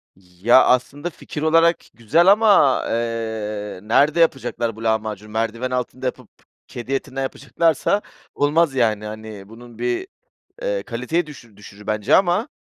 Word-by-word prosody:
Ya, 95 Hz, +7 st, +3 dB
aslında 140 Hz, +6 st, 0 dB
fikir 150 Hz, -1 st, -8 dB
olarak 165 Hz, +2 st, +4 dB, 0.2 s
güzel 135 Hz, -, +2 dB
ama, 205 Hz, -10 st, +4 dB
eee, 110 Hz, -3 st, -3 dB
nerede 145 Hz, +9 st, +3 dB
yapacaklar 120 Hz, -7 st, 0 dB
bu 115 Hz, -, -10 dB
lahmacunu? 110 Hz, -1 st, -2 dB
Merdiven 115 Hz, +3 st, -2 dB
altında 125 Hz, +1 st, -3 dB
yapıp 125 Hz, -2 st, -4 dB, 0.4 s
kedi 120 Hz, +3 st, -6 dB
etinden 135 Hz, 0 st, -3 dB
yapacaklarsa 165 Hz, +7 st, 0 dB, 0.3 s
olmaz 145 Hz, 0 st, +2 dB
yani, 110 Hz, -4 st, +1 dB
hani, 105 Hz, -2 st, -9 dB
bunun 120 Hz, 0 st, -13 dB
bir, 120 Hz, -, -2 dB, 0.6 s
eee, -, -, -1 dB
kaliteyi 170 Hz, 0 st, -2 dB
düşü 120 Hz, -8 st, -14 dB
düşürür 105 Hz, 0 st, -14 dB
bence 110 Hz, +5 st, +2 dB
ama, 190 Hz, +4 st, +1 dB
120 Hz, 135 wpm, -21 LUFS, 110-150 Hz, 0.6 s, olarak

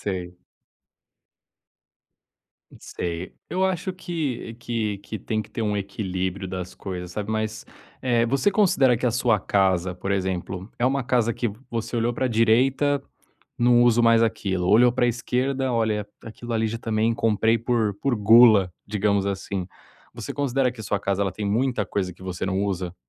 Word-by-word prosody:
Sei. 90 Hz, -3 st, -4 dB, 2.4 s
Sei. 85 Hz, +1 st, -5 dB, 0.2 s
Eu 185 Hz, +1 st, 0 dB
acho 185 Hz, 0 st, -1 dB
que 155 Hz, -11 st, -4 dB
que 115 Hz, -4 st, -3 dB
que 105 Hz, +1 st, -7 dB
tem 110 Hz, +3 st, -2 dB
que -, -, -18 dB
ter 115 Hz, -, -4 dB
um 105 Hz, -1 st, 0 dB
equilíbrio 95 Hz, -1 st, -3 dB
das 90 Hz, -1 st, -6 dB
coisas, 90 Hz, -2 st, -6 dB
sabe. 105 Hz, +1 st, -4 dB
Mas, 110 Hz, 0 st, -2 dB, 0.4 s
eh, 120 Hz, -2 st, +2 dB
você 140 Hz, -, +2 dB
considera 155 Hz, -, +3 dB
que 125 Hz, -, -1 dB
a -, -, +3 dB
sua 115 Hz, -2 st, +2 dB
casa, 95 Hz, -2 st, +1 dB
por 95 Hz, +2 st, -5 dB
exemplo, 95 Hz, 0 st, -2 dB
é 120 Hz, -, 0 dB
uma 135 Hz, 0 st, +1 dB
casa 120 Hz, -2 st, +1 dB
que 120 Hz, -, -2 dB, 0.2 s
você 115 Hz, 0 st, -4 dB
olhou 115 Hz, +1 st, +1 dB
pra 130 Hz, +2 st, -1 dB
direita, 130 Hz, +5 st, +2 dB, 0.6 s
"não 120 Hz, 0 st, +5 dB
uso 120 Hz, -1 st, +4 dB
mais 115 Hz, 0 st, +5 dB
aquilo", 95 Hz, -5 st, -1 dB
olhou 120 Hz, +4 st, +6 dB
pra 125 Hz, -1 st, +2 dB
esquerda, 130 Hz, +2 st, -1 dB
"olha 110 Hz, -3 st, 0 dB, 0.2 s
aquilo 115 Hz, +1 st, -8 dB
ali 110 Hz, 0 st, +1 dB
já 115 Hz, -, -4 dB
também 115 Hz, 0 st, 0 dB
comprei 115 Hz, +1 st, +2 dB
por 115 Hz, -3 st, 0 dB, 0.2 s
gula", 105 Hz, -3 st, +6 dB
digamos 100 Hz, -1 st, 0 dB
assim. 95 Hz, -1 st, -3 dB, 0.5 s
Você -, -, -6 dB
considera 135 Hz, -2 st, 0 dB
que 120 Hz, -2 st, -11 dB
a -, -, -7 dB
sua 100 Hz, -, -1 dB
casa 100 Hz, -1 st, 0 dB
tem 105 Hz, -, -5 dB
muita 115 Hz, +1 st, 0 dB
coisa 90 Hz, -1 st, -2 dB
que 90 Hz, -, -17 dB
você 95 Hz, 0 st, -4 dB
não 95 Hz, +1 st, 0 dB
usa? 90 Hz, -3 st, -3 dB
110 Hz, 165 wpm, -24 LUFS, 100-120 Hz, 2.4 s, olhou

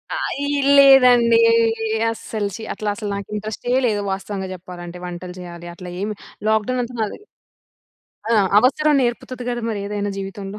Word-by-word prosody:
అయి 285 Hz, +1 st, -2 dB, 0.3 s
లేదండి. 250 Hz, -4 st, +7 dB, 0.7 s
అసలు 215 Hz, -2 st, -4 dB
ఛీ! 225 Hz, -, -8 dB
అట్లా 210 Hz, -1 st, -3 dB
అసల 210 Hz, -1 st, -5 dB
నాకింట్రెస్టె 210 Hz, +4 st, -4 dB
లేదు. 205 Hz, -2 st, 0 dB
వాస్తవంగా 190 Hz, 0 st, -4 dB
చెప్పాలంటే. 175 Hz, -1 st, -9 dB
వంటలు 180 Hz, 0 st, -7 dB
చేయాలి 175 Hz, -1 st, -9 dB
అట్లా 180 Hz, 0 st, -9 dB
ఏమి 210 Hz, +1 st, -3 dB, 0.3 s
లాక్‌డౌన్ 220 Hz, +4 st, +1 dB
అంతా 240 Hz, +1 st, -8 dB
బాగానే 215 Hz, -, -3 dB, 1.1 s
ఆ! -, -, +5 dB, 0.2 s
అవసరం 295 Hz, +5 st, +3 dB
నేర్పుతది 245 Hz, +1 st, -3 dB
కదా! 240 Hz, 0 st, -2 dB
మరి 205 Hz, -2 st, -3 dB
ఏదైనా 205 Hz, 0 st, -3 dB
జీవితంలో. 195 Hz, +1 st, -6 dB
210 Hz, 135 wpm, -21 LUFS, 195-240 Hz, 1.1 s, లేదండి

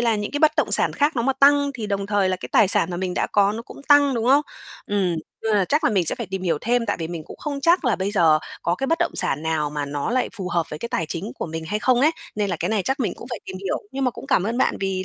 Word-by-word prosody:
là 230 Hz, -2 st, +2 dB
những 205 Hz, 0 st, -4 dB
cái 290 Hz, -, -2 dB
bất 305 Hz, 0 st, +4 dB
động 305 Hz, -, +1 dB
sản -, -, +6 dB
khác 290 Hz, 0 st, 0 dB
nó 235 Hz, -, +1 dB
mà 270 Hz, -, +2 dB
tăng 285 Hz, +1 st, +4 dB
thì 220 Hz, -4 st, -5 dB
đồng 200 Hz, -1 st, -2 dB
thời 205 Hz, -2 st, +1 dB
là 185 Hz, -, 0 dB
cái -, -, -8 dB
tài 200 Hz, -, +5 dB
sản 185 Hz, -, +4 dB
mà 175 Hz, -, -4 dB
mình 180 Hz, 0 st, -3 dB
đã -, -, 0 dB
có 205 Hz, 0 st, +3 dB
nó 225 Hz, -, -5 dB
cũng 260 Hz, -, -13 dB
tăng, 285 Hz, -2 st, +5 dB
đúng 230 Hz, -1 st, -1 dB
không? 275 Hz, +3 st, +5 dB, 0.4 s
Ừm. 190 Hz, -4 st, 0 dB, 0.3 s
Nên 220 Hz, -1 st, +1 dB
là 195 Hz, -, +2 dB
chắc 295 Hz, -, 0 dB
là -, -, +3 dB
mình 190 Hz, -5 st, +1 dB
sẽ -, -, +3 dB
phải 235 Hz, -, -6 dB
tìm 190 Hz, 0 st, -5 dB
hiểu 165 Hz, -4 st, 0 dB
thêm 240 Hz, 0 st, 0 dB
tại 205 Hz, -, -1 dB
vì 160 Hz, -, -3 dB
mình 170 Hz, -2 st, -6 dB
cũng -, -, -11 dB
không 285 Hz, -2 st, -4 dB
chắc 335 Hz, +3 st, +3 dB
là 245 Hz, -4 st, +2 dB
bây 195 Hz, +1 st, -2 dB
giờ 165 Hz, -6 st, +4 dB, 0.2 s
có 170 Hz, -, +1 dB
cái 270 Hz, +9 st, -3 dB
bất 330 Hz, +2 st, +1 dB
động 345 Hz, -, 0 dB
sản 145 Hz, -, +1 dB
nào 160 Hz, -2 st, -1 dB
mà 145 Hz, -1 st, -3 dB
nó 145 Hz, +5 st, -3 dB
lại 255 Hz, +1 st, 0 dB
phù 190 Hz, -3 st, -4 dB
hợp 170 Hz, -2 st, 0 dB
với 150 Hz, -, -6 dB
cái 235 Hz, -, -5 dB
tài 165 Hz, -, -2 dB
chính 185 Hz, +8 st, -5 dB
của -, -, -5 dB
mình 160 Hz, 0 st, -6 dB
hay 210 Hz, +5 st, -2 dB
không 250 Hz, +2 st, +2 dB
ấy, 300 Hz, +4 st, +5 dB, 0.3 s
nên 205 Hz, -2 st, -1 dB
là 175 Hz, -, -1 dB
cái -, -, -1 dB
này 215 Hz, -3 st, 0 dB
chắc 265 Hz, +7 st, -2 dB
mình 235 Hz, -, 0 dB
cũng 240 Hz, -, -11 dB
phải 240 Hz, -, -4 dB
tìm 190 Hz, -, -7 dB
hiểu. 195 Hz, 0 st, -3 dB
Nhưng 270 Hz, 0 st, -2 dB
mà 250 Hz, -, +2 dB
cũng -, -, -11 dB
cảm -, -, +2 dB
ơn 225 Hz, +5 st, -2 dB
bạn -, -, +1 dB
vì 190 Hz, -1 st, -2 dB
205 Hz, 330 wpm, -22 LUFS, 180-255 Hz, 0.4 s, sản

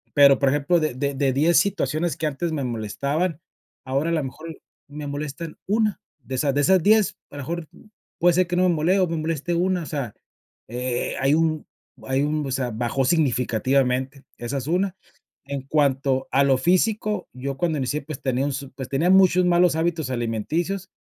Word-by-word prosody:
Pero, 140 Hz, -2 st, +7 dB
por 140 Hz, -1 st, +3 dB
ejemplo, 145 Hz, +5 st, +2 dB
de 155 Hz, -5 st, -1 dB
de 140 Hz, +2 st, -1 dB
de 135 Hz, -1 st, +1 dB
10 155 Hz, +6 st, +3 dB
situaciones 160 Hz, -3 st, 0 dB
que 160 Hz, -, -2 dB
antes 155 Hz, +3 st, -3 dB
me 150 Hz, -3 st, -2 dB
molestaban, 140 Hz, -, -2 dB, 0.5 s
ahora, 135 Hz, +5 st, 0 dB
a -, -, +1 dB
la 155 Hz, -3 st, 0 dB
mejor 155 Hz, +5 st, -7 dB
y -, -, -13 dB, 0.3 s
me 150 Hz, +1 st, -7 dB
molestan 150 Hz, +3 st, -5 dB
1, 215 Hz, 0 st, +1 dB, 0.2 s
de 130 Hz, -, -5 dB
esas 140 Hz, +1 st, +1 dB
de 145 Hz, -, +3 dB
esas 185 Hz, +4 st, +4 dB
10, 215 Hz, +1 st, +3 dB
a -, -, -12 dB
lo 140 Hz, -, -5 dB
mejor, 170 Hz, +3 st, -4 dB, 0.5 s
puede 175 Hz, +1 st, +4 dB
ser 185 Hz, -1 st, +3 dB
que 175 Hz, -, -2 dB
no 180 Hz, -, +3 dB
me 175 Hz, -, +3 dB
mole 175 Hz, +5 st, +2 dB
o 185 Hz, -, +4 dB
me 165 Hz, -, -3 dB
moleste 160 Hz, +1 st, -2 dB
una. 180 Hz, 0 st, +1 dB
O -, -, -7 dB
sea, 135 Hz, -8 st, -4 dB, 0.6 s
eh, 125 Hz, +1 st, -2 dB
hay 135 Hz, +3 st, +3 dB
un 160 Hz, -1 st, 0 dB, 0.4 s
hay 135 Hz, +1 st, 0 dB
un, 150 Hz, +1 st, 0 dB
o -, -, -4 dB
sea, 130 Hz, -2 st, -1 dB
bajó 120 Hz, +4 st, -1 dB
significativamente, 130 Hz, -1 st, +1 dB, 0.2 s
esa 120 Hz, +4 st, -3 dB
es 130 Hz, -, -4 dB
una. 185 Hz, +3 st, 0 dB, 0.5 s
En 140 Hz, -1 st, -4 dB
cuanto 135 Hz, -2 st, +1 dB
a 135 Hz, +2 st, +4 dB
lo 135 Hz, -1 st, +3 dB
físico, 210 Hz, -, +1 dB
yo 135 Hz, +2 st, -5 dB
cuando 165 Hz, 0 st, 0 dB
inicié, 140 Hz, +3 st, -1 dB
pues, 155 Hz, -1 st, -7 dB
tenía 130 Hz, 0 st, 0 dB
un 145 Hz, -, -1 dB
su 135 Hz, 0 st, -6 dB
pues, 130 Hz, -1 st, -7 dB
tenía 150 Hz, +6 st, +1 dB
muchos 185 Hz, -1 st, +5 dB
malos 175 Hz, -1 st, +4 dB
hábitos 160 Hz, -3 st, -1 dB
alimenticios, 160 Hz, -, -2 dB
145 Hz, 200 wpm, -23 LUFS, 135-170 Hz, 0.6 s, Pero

